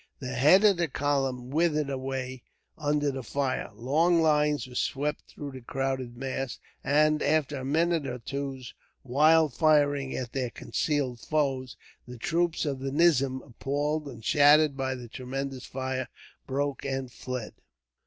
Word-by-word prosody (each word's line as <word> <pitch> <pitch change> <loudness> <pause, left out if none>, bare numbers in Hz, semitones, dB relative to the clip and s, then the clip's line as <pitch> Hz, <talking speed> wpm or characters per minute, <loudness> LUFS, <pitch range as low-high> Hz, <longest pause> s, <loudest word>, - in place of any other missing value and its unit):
The 130 -2 -5
head 150 +11 +6
of 205 -4 +5
the 170 -1 +1
column 135 -3 -1
withered 155 -2 +1
away 130 -1 -4 0.3
under 145 -1 0
the 135 0 -5
fire, 135 0 -2
long 155 +9 +2
lines 150 -2 +2
were 125 - -12
swept 145 +4 -2
through 145 -1 -8
the 130 -1 -9
crowded 130 -1 -3
mass; 135 0 -3 0.3
and, 150 +2 +3
after 150 -2 +1
a 130 - -5
minute 160 +2 +1
or 125 - -4
two's 135 0 -5 0.3
wild 155 +3 +4
firing 145 -3 +2
at 125 -2 -5
their 130 -3 -1
concealed 135 -2 -2
foes, 135 -2 -1 0.3
the 125 0 -9
troops 170 +7 0
of 140 -3 -2
the 135 0 -3
nizam, 140 -4 +3
appalled 145 +4 -2
and 115 -5 -10
shattered 150 -1 +5
by 130 -1 -2
the 125 -2 -8
tremendous 130 +2 -5
fire, 130 -1 -3 0.4
broke 140 +1 -2
and 135 -2 -3
fled. 125 -2 -6
135 Hz, 150 wpm, -28 LUFS, 130-150 Hz, 0.4 s, head